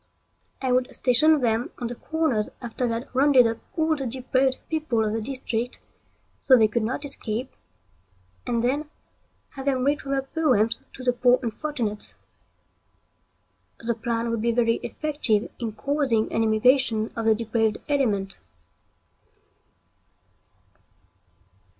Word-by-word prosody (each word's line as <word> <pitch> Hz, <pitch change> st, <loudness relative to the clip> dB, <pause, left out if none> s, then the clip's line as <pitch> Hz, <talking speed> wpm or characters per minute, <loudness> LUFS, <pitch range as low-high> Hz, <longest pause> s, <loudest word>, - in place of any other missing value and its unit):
I 260 Hz, -, +1 dB
would 250 Hz, +1 st, 0 dB
station 295 Hz, +4 st, +5 dB
them 230 Hz, 0 st, 0 dB
on 245 Hz, -, -5 dB
the 235 Hz, -, -3 dB
corners 295 Hz, -5 st, -1 dB
after 240 Hz, +1 st, -3 dB
they 230 Hz, -, -1 dB
had 235 Hz, +3 st, -6 dB
rounded 265 Hz, -1 st, +5 dB
up 230 Hz, 0 st, -1 dB, 0.2 s
all 320 Hz, 0 st, +2 dB
the 270 Hz, -3 st, -4 dB
depraved 260 Hz, +2 st, 0 dB
people 300 Hz, -9 st, 0 dB
of 210 Hz, -, -1 dB
the 225 Hz, -, -2 dB
district 245 Hz, -1 st, -3 dB, 0.6 s
so 260 Hz, -2 st, +6 dB
they 220 Hz, -2 st, +5 dB
could 220 Hz, +2 st, -1 dB
not 255 Hz, +7 st, -3 dB
escape, 250 Hz, -3 st, -3 dB, 1.0 s
and 235 Hz, -1 st, 0 dB
then 285 Hz, +5 st, -1 dB, 0.6 s
have 270 Hz, -1 st, -8 dB
them 260 Hz, -2 st, +1 dB
read 290 Hz, +2 st, +1 dB
from 275 Hz, -1 st, -4 dB
their 270 Hz, -1 st, 0 dB
poems 255 Hz, -7 st, +1 dB
to 260 Hz, -, -10 dB
the 250 Hz, -1 st, +2 dB
poor 245 Hz, 0 st, +3 dB
unfortunates. 230 Hz, -3 st, -3 dB, 1.6 s
The 235 Hz, 0 st, -2 dB
plan 230 Hz, 0 st, -2 dB
would 230 Hz, -2 st, -1 dB
be 235 Hz, +1 st, +1 dB
very 230 Hz, -1 st, +2 dB
effective 285 Hz, -9 st, 0 dB
in 230 Hz, -3 st, -3 dB
causing 265 Hz, -2 st, 0 dB
an 225 Hz, -, +1 dB
emigration 225 Hz, 0 st, +2 dB
of 230 Hz, -1 st, -2 dB
the 220 Hz, -, +5 dB
depraved 225 Hz, -1 st, 0 dB
element. 210 Hz, -10 st, 0 dB
245 Hz, 140 wpm, -25 LUFS, 225-270 Hz, 1.6 s, so